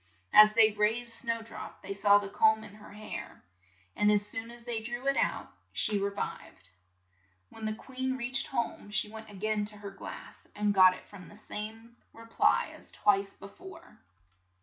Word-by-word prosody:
As 215 0 +9
they 220 -1 +6
raised 225 +3 0
Snow 230 -1 -2
drop 225 - -10
they 195 +1 -5
saw 205 +1 +5
the 205 -1 -2
comb 220 +2 +3
in 210 -2 -12
her 210 0 -14
hair, 215 +1 -8 0.5
and 210 0 +3
as 205 -1 +3
soon 225 +2 -5
as 235 0 -12
they 235 -2 -3
drew 240 +3 -6
it 275 0 +2
out - - -1 0.2
she 210 -1 +3
re 200 0 0
vived. 95 - -7 0.8
When 225 - -9
the 215 0 -1
queen 260 +2 -4
reached 255 +2 0
home 235 -4 -3
she 210 0 0
went 220 0 -10
a 205 - -12
gain 215 +2 -1
to 210 0 -4
her 200 -1 -8
glass, 195 - -10
and 210 0 +1
got 185 -1 +6
from 195 -3 -12
it - - -14
the - - -14
same 225 +3 -7 0.2
re 230 - -13
ply 230 - +2
as - - -12
twice 195 -1 +1
be - - -11
fore. 365 - -14
215 Hz, 195 wpm, -30 LUFS, 205-230 Hz, 0.8 s, As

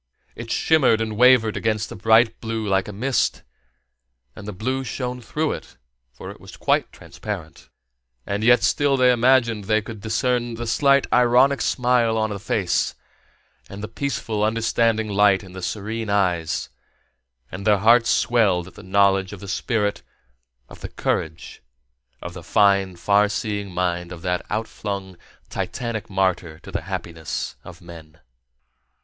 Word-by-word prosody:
It - - -8
shimmered 135 -8 +3
and 110 -1 -3
wavered 120 -2 +5
against 110 0 -1
the - - -8
bright 115 +1 +3
blue 110 -1 -3
like 95 -1 +1
a - - -5
mist, 125 +6 -1 0.9
and 100 - -10
the - - -3
blue 130 +7 -2
shone 125 +1 -4
through 155 +6 -2
it, - - -8 0.3
for 65 - -9
it - - -14
was - - -12
quite - - +1
transparent. - - -8 0.6
And 100 +2 -2
yet 120 +2 +5
still 140 -2 +2
they 125 -1 +5
imagined 120 -3 +2
they 110 +1 +2
could 110 -2 -9
discern 120 +1 -1
the 120 +1 -5
slight 140 +4 +3
ironic 125 +3 +4
smile 120 -3 +2
on 110 -1 0
the 100 - -4
face, 95 -3 0 0.7
and 100 +1 -8
the - - -3
peaceful, 110 -3 -3
understanding 115 0 +1
light 100 -1 +3
in 95 -1 -13
the 95 - -8
serene 110 +4 -4
eyes; 90 -8 0 0.8
and 95 +2 -7
their 105 -1 +5
hearts 115 +3 +4
swelled 105 -8 +2
at - - -22
the - - -12
knowledge 95 0 +2
of 100 - -9
the 100 - -10
spirit, 105 0 -1 0.7
of - - -14
the - - -6
courage, 80 0 -3 0.6
of 90 - -6
the 90 - -9
fine, 100 +1 +2
far 100 +4 +2
seeing 105 -2 -3
mind 90 -1 -2
of 85 -2 -9
that 90 0 -1
outflung 100 -3 -4 0.3
titanic 115 -3 -4
martyr 95 -4 -1
to - - -11
the - - -3
happiness 80 -2 -5
of - - -12
men. 80 -2 -13
105 Hz, 155 wpm, -22 LUFS, 95-120 Hz, 0.9 s, wavered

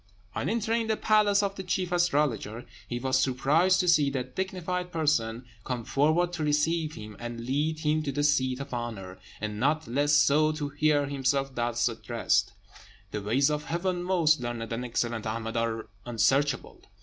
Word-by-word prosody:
On - - -2
entering 225 0 0
the 220 -1 0
palace 210 -1 +3
of 200 -1 -1
the - - -3
chief 185 -1 -1
astrologer, 145 -10 0 0.2
he 120 - -3
was 130 +1 +1
surprised 150 +9 +3
to 180 - -2
see 155 -5 +4
that 130 -2 -4
dignified 180 -1 -3
person 125 -8 0 0.2
come 125 -3 -4
forward 160 +5 +2
to 165 -3 -3
receive 155 +1 +1
him, 105 -1 -9
and 120 0 -6
lead 150 +4 -1
him 155 0 +1
to 145 -2 -2
the 145 +2 -1
seat 130 -3 +2
of 140 -1 -7
honour, 110 -6 -5 0.2
and 105 0 -4
not 155 +5 +1
less 145 +4 +1
so 150 +1 +4
to 150 -2 -3
hear 145 0 +2
himself 135 0 -1
thus 120 -1 0
addressed: 115 - 0 0.6
"The 105 - -3
ways 130 +8 +2
of 150 0 -2
Heaven, 175 +1 -1
most 170 -4 +3
learned 120 -2 -4
and 120 +2 -3
excellent 120 -2 -2
Ahmed, 115 +1 -4
are 115 -1 -1 0.2
unsearchable. 130 +4 0
145 Hz, 175 wpm, -28 LUFS, 120-160 Hz, 0.6 s, see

